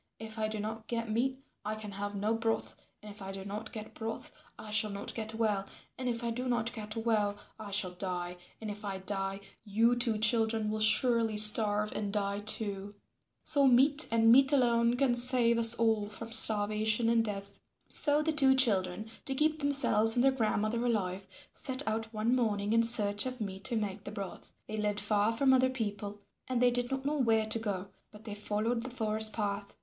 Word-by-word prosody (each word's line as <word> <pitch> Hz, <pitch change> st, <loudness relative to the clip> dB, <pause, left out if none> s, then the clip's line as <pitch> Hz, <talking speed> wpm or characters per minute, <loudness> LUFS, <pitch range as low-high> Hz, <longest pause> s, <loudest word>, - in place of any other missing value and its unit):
If 220 Hz, 0 st, -10 dB
I 215 Hz, -, -1 dB
do 215 Hz, 0 st, -6 dB
not 220 Hz, +1 st, -7 dB
get 230 Hz, -2 st, -4 dB
meat 260 Hz, +4 st, -1 dB, 0.3 s
I 215 Hz, +1 st, -4 dB
can 215 Hz, -1 st, -9 dB
have 205 Hz, +1 st, -6 dB
no 210 Hz, +3 st, -2 dB
broth, 225 Hz, 0 st, -3 dB, 0.3 s
and 210 Hz, -, -10 dB
if 205 Hz, -, -15 dB
I 195 Hz, 0 st, -7 dB
do 195 Hz, 0 st, -9 dB
not 210 Hz, +2 st, -7 dB
get 215 Hz, -1 st, -9 dB
broth 225 Hz, 0 st, -7 dB, 0.3 s
I 215 Hz, -, -11 dB
shall 215 Hz, 0 st, +1 dB
not 200 Hz, 0 st, -7 dB
get 220 Hz, -1 st, -6 dB
well, 210 Hz, -3 st, -2 dB, 0.3 s
and 255 Hz, -1 st, -4 dB
if 235 Hz, 0 st, -4 dB
I 235 Hz, -, -2 dB
do 250 Hz, +2 st, -5 dB
not 235 Hz, -1 st, -2 dB
get 215 Hz, -1 st, -7 dB
well 215 Hz, -3 st, -1 dB, 0.2 s
I 215 Hz, -2 st, -9 dB
shall 195 Hz, -2 st, -1 dB
die, 180 Hz, -1 st, -6 dB, 0.2 s
and 215 Hz, -2 st, -6 dB
if 210 Hz, +1 st, -11 dB
I 195 Hz, -2 st, -5 dB
die 195 Hz, 0 st, -5 dB, 0.2 s
you 225 Hz, +3 st, +1 dB
two 240 Hz, -2 st, 0 dB
children 220 Hz, 0 st, +1 dB
will 215 Hz, -, -4 dB
surely 225 Hz, 0 st, +4 dB
starve 210 Hz, 0 st, +3 dB
and 205 Hz, -1 st, -5 dB
die 200 Hz, -1 st, -3 dB
too. 205 Hz, -1 st, -3 dB, 0.5 s
So 285 Hz, -3 st, +2 dB
meat 275 Hz, +4 st, +3 dB
and 225 Hz, 0 st, +3 dB
meat 270 Hz, +3 st, +6 dB
alone 240 Hz, -3 st, +1 dB
can 265 Hz, -2 st, +1 dB
save 240 Hz, -1 st, +3 dB
us 230 Hz, 0 st, +10 dB
all 220 Hz, -3 st, 0 dB
from 225 Hz, +2 st, -10 dB
starvation 215 Hz, +1 st, +5 dB
and 230 Hz, 0 st, +2 dB
death." 200 Hz, -2 st, -7 dB, 0.3 s
So 295 Hz, 0 st, +2 dB
the 320 Hz, 0 st, -1 dB
two 270 Hz, -3 st, +3 dB
children, 205 Hz, -5 st, 0 dB, 0.2 s
to 270 Hz, -, -1 dB
keep 310 Hz, +2 st, 0 dB
themselves 255 Hz, -6 st, +5 dB
and 245 Hz, -, +1 dB
their 270 Hz, -, +4 dB
grandmother 225 Hz, -2 st, -2 dB
alive, 195 Hz, -5 st, -3 dB, 0.2 s
set 260 Hz, -1 st, -5 dB
out 220 Hz, 0 st, -4 dB
one 225 Hz, +3 st, -1 dB
morning 210 Hz, -4 st, -1 dB
in 230 Hz, -, +3 dB
search 210 Hz, -1 st, +4 dB
of 255 Hz, 0 st, -7 dB
meat 195 Hz, -2 st, -7 dB
to 255 Hz, -3 st, +3 dB
make 205 Hz, -2 st, -5 dB
the 205 Hz, -, -7 dB
broth. 200 Hz, -3 st, -9 dB, 0.2 s
They 215 Hz, -, -6 dB
lived 210 Hz, -1 st, -2 dB
far 210 Hz, +1 st, 0 dB
from 265 Hz, +4 st, +1 dB
other 260 Hz, 0 st, +2 dB
people 205 Hz, -5 st, -6 dB, 0.3 s
and 255 Hz, -2 st, -2 dB
they 245 Hz, 0 st, +3 dB
did 245 Hz, 0 st, -2 dB
not 270 Hz, 0 st, -5 dB
know 300 Hz, +1 st, -2 dB
where 225 Hz, -3 st, +1 dB
to 220 Hz, +1 st, -1 dB
go, 200 Hz, -3 st, -5 dB, 0.2 s
but 210 Hz, 0 st, -16 dB
they 215 Hz, -2 st, -8 dB
followed 215 Hz, +3 st, -3 dB
the 255 Hz, -, -7 dB
forest 220 Hz, -3 st, +2 dB
path. 200 Hz, -1 st, -5 dB
220 Hz, 205 wpm, -30 LUFS, 205-240 Hz, 0.5 s, us